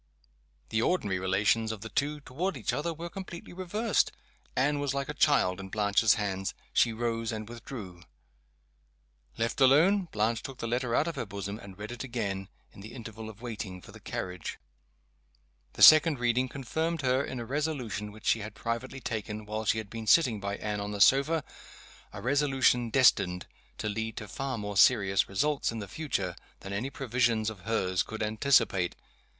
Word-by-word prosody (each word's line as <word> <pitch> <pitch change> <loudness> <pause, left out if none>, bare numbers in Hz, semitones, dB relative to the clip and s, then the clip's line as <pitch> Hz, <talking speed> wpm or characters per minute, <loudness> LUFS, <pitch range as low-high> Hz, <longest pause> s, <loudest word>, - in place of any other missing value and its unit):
The 110 - +1
ordinary 105 - +1
relations 100 +4 +2
of 110 -3 -7
the 115 - -7
two 145 +3 -1
toward 170 +9 -3
each - - -2
other 170 +3 -1
were 165 +1 -6
completely 180 -2 -8
reversed. 200 +5 0 0.4
Anne 145 +3 +2
was 140 -1 -1
like 140 0 -2
a - - -2
child 135 -11 +3
in 95 0 -7
Blanche's 105 +1 +3
hands. 95 -2 -2 0.2
She 120 - +4
rose, 115 0 -2
and 110 -1 -5
withdrew. 110 -6 -8 1.4
Left 115 +2 -1
alone, 170 +9 +5
Blanche 110 +2 0
took 135 -2 -8
the - - -5
letter 120 0 0
out 155 - +2
of 165 - -4
her - - -2
bosom, 100 +1 -5
and 95 -2 -11
read 105 +3 -7
it 120 - -6
again, 100 -6 -3 0.2
in - - -13
the 110 +4 -10
interval 110 -2 -8
of 110 +2 -13
waiting 105 -6 -5
for - - -14
the - - -12
carriage. 90 -2 -5 1.2
The - - +2
second 155 -1 +9
reading 125 +1 +1
confirmed 160 +4 -2
her 130 +1 +2
in 130 - -5
a 120 - -5
resolution 130 -6 -2
which 110 +1 -14
she 115 - +3
had 105 0 -7
privately 115 +4 -4
taken, 110 -2 -4
while 110 +1 -4
she 110 - +2
had 110 -2 -5
been 115 -1 -6
sitting 120 -4 +5
by 100 0 -3
Anne 105 -1 -3
on 100 - -4
the 100 - -4
sofa 140 +8 +4 0.7
a - - -8
resolution 130 -3 +2
destined 100 -8 +3 0.3
to - - -3
lead 110 +1 -3
to 105 - -5
far 135 +5 -3
more 105 -2 -4
serious 100 -4 +4
results 140 +9 0
in 115 - -5
the 100 -2 -5
future 95 - -3 0.3
than 100 - -6
any 115 +7 -2
previsions 120 -5 0
of 105 - -11
hers 95 -5 +1
could 110 0 -4
anticipate. 110 -5 +2
115 Hz, 180 wpm, -29 LUFS, 105-135 Hz, 1.4 s, second